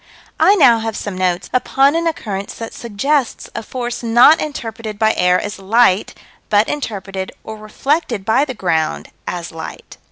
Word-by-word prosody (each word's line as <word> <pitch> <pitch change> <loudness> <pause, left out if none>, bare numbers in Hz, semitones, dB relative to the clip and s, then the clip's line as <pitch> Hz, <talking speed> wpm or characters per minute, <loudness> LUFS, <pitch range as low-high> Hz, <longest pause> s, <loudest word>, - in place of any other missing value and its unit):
I 400 - +6
now 255 - +6
have 225 -1 -3
some 205 -2 -5
notes 180 -1 -1
upon 270 +3 +3
an 335 0 0
occurrence 200 -11 -4
that 225 -1 -7
suggests 245 +4 -1
a - - -4
force 240 +1 -5
not 240 +6 +6
interpreted 225 -7 -5
by 220 +1 +3
air 180 0 +3
as 205 -2 -5
light, 205 0 +2 0.3
but 210 +1 +3
interpreted, 195 -8 -4
or 220 - -7
reflected 230 - -2
by 235 +6 +3
the 260 -3 -6
ground 160 -6 -1 0.2
as 175 -2 -4
light. 160 0 -9
220 Hz, 160 wpm, -18 LUFS, 195-255 Hz, 0.3 s, I